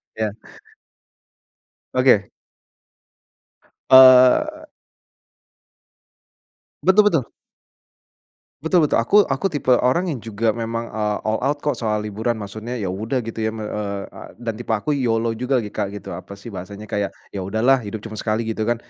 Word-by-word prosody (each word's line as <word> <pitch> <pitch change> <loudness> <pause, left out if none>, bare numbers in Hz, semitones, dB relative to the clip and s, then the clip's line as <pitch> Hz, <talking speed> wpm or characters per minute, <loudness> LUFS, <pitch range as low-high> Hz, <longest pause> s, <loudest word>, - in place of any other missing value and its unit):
Iya. 110 -1 -1 1.6
Oke. - - +3 1.6
Eee. 130 - +7 2.1
Betul 195 +3 +5
betul. 140 -8 0 1.3
Betul 165 +1 +3
betul, 150 - +2
aku 205 - +4
aku 135 +5 -1
tipe 145 -7 -1
orang 130 +9 +2
yang 135 - -4
juga 110 +1 -1
memang, 115 +1 -4
eee, 105 -1 -1
all 110 0 0
out 145 +3 -2
kok 145 - -1
soal 105 -2 -1
liburan 110 +3 -2
maksudnya 110 +3 -6
ya 100 -6 -3
udah 110 +6 -2
gitu 115 0 -7
ya 110 - -4
eee, 105 -2 -4
e - - -12 0.2
dan 120 -1 -4
tipe 115 -2 -1
aku 110 +8 -2
YOLO 115 -5 0
juga 125 +2 -1
gitu, 105 - -7
Kak, 100 - 0 0.3
apa 100 - -11
sih 100 +4 -11
bahasanya 100 +2 -8
kayak, 105 -1 -2 0.2
ya 100 - -5
udahlah 110 +8 +2
hidup 105 -2 -7
cuma 110 -1 -7
sekali 110 +1 -1
gitu 110 0 -3
kan, 120 - +2
115 Hz, 145 wpm, -21 LUFS, 105-130 Hz, 2.1 s, Eee